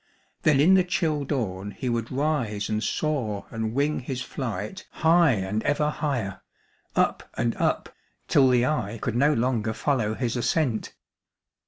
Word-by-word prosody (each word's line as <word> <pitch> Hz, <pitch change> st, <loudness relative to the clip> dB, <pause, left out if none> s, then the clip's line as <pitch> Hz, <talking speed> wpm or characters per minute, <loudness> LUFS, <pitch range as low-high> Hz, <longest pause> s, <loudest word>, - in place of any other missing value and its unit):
Then 150 Hz, -3 st, +4 dB
in 165 Hz, +7 st, +6 dB
the 190 Hz, -1 st, +6 dB
chill 165 Hz, -5 st, 0 dB
dawn 105 Hz, -9 st, -2 dB
he 130 Hz, -, -4 dB
would 115 Hz, -1 st, -1 dB
rise 130 Hz, -7 st, -1 dB
and 110 Hz, 0 st, -1 dB
soar 125 Hz, -10 st, -1 dB
and 110 Hz, 0 st, -3 dB
wing 145 Hz, +2 st, +1 dB
his 125 Hz, 0 st, -4 dB
flight 115 Hz, -, -5 dB
high 165 Hz, -2 st, +4 dB
and 100 Hz, +1 st, -1 dB
ever 150 Hz, +3 st, +1 dB
higher, 120 Hz, -12 st, -2 dB, 0.5 s
up -, -, +1 dB
and 115 Hz, -1 st, 0 dB
up, -, -, 0 dB, 0.3 s
till 135 Hz, -2 st, +5 dB
the 125 Hz, -1 st, +4 dB
eye 115 Hz, -7 st, -1 dB
could 115 Hz, -, -2 dB
no 140 Hz, +5 st, +4 dB
longer 115 Hz, -3 st, 0 dB
follow 115 Hz, -4 st, 0 dB
his 120 Hz, -1 st, -2 dB
ascent. 125 Hz, -1 st, 0 dB
125 Hz, 155 wpm, -26 LUFS, 110-150 Hz, 0.5 s, in